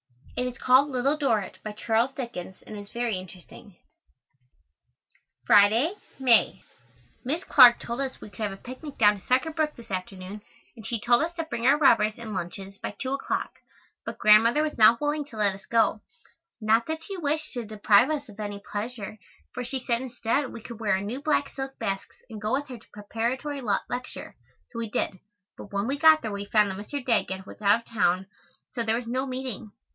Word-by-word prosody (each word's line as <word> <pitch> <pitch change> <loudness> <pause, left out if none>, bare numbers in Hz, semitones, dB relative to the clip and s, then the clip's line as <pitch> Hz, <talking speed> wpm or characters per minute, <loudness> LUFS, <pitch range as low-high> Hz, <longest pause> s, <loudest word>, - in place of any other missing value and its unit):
It 250 - -1
is 250 0 -6
called 260 +3 +4
Little 270 +2 +1
Dorritt, 225 -9 0
by 215 - -6
Charles 230 +4 0
Dickens, 190 -8 -7
and 215 - -9
is 205 -1 -9
very 235 -4 -1
interesting. 185 +2 -12 1.7
Friday, 220 - +5 0.2
May. 255 -4 +3 0.6
Miss 305 +8 -2
Clark 245 -3 +8
told 235 +3 -4
us 265 -1 -4
we 210 - -11
could - - -17
have 210 -2 -1
a 195 - -8
picnic 260 +6 -9
down 205 -2 +4
to - - -21
Sucker 260 +6 +2
Brook 310 -1 -1
this 230 -3 -13
afternoon 185 +2 -5 0.3
and 220 -4 -10
she 235 - -2
told 240 +4 +3
us 330 +1 -1
to 330 - -2
bring 235 -6 -2
our 280 +2 +6
rubbers 220 -7 +4
and 225 -2 -7
lunches 195 +2 -6
by - - -5
two 265 -1 -2
o'clock; 275 - -2 0.5
but - - -6
Grandmother 225 +7 +5
was 305 -5 -3
not 225 +2 +7
willing 295 0 -1
to 240 -6 -13
let 205 -2 +2
us 195 - -13
go; 225 -2 +2 0.6
not 225 +1 +2
that 320 0 -4
she 390 +2 -6
wished 310 -1 -2
to 245 -2 -3
deprive 215 +3 +4
us 295 -2 -2
of 210 -1 -14
any 205 -1 -4
pleasure 215 -1 -5 0.3
for 250 - -4
she 260 +2 -3
said 235 -2 +1
instead 250 +1 -1
we 230 - -9
could 235 -1 -9
wear 210 -3 +1
our 190 - +1
new 230 +7 -5
black 295 -2 +1
silk 270 0 -6
basks 195 -3 -4
and 220 -4 -9
go 215 +3 -1
with 285 +2 0
her 250 -2 -8
to - - -22
Preparatory 240 +7 -3 0.3
lecture, 250 0 -6 0.4
so 230 - -6
we 230 -2 -3
did, 190 -2 -2 0.4
but 200 - -11
when 200 0 -1
we 275 +3 -2
got 315 -2 +6
there 220 - -3
we 200 0 -4
found 210 -1 +3
that 190 - -6
Mr. 255 +6 -6
Daggett 190 -6 0
was - - -12
out 205 +3 +4
of - - -29
town 185 -4 +1 0.5
so 245 - -3
there 225 -1 +1
was 240 +1 -3
no 255 +3 -2
meeting. 255 -4 -5
235 Hz, 205 wpm, -26 LUFS, 210-265 Hz, 1.7 s, Clark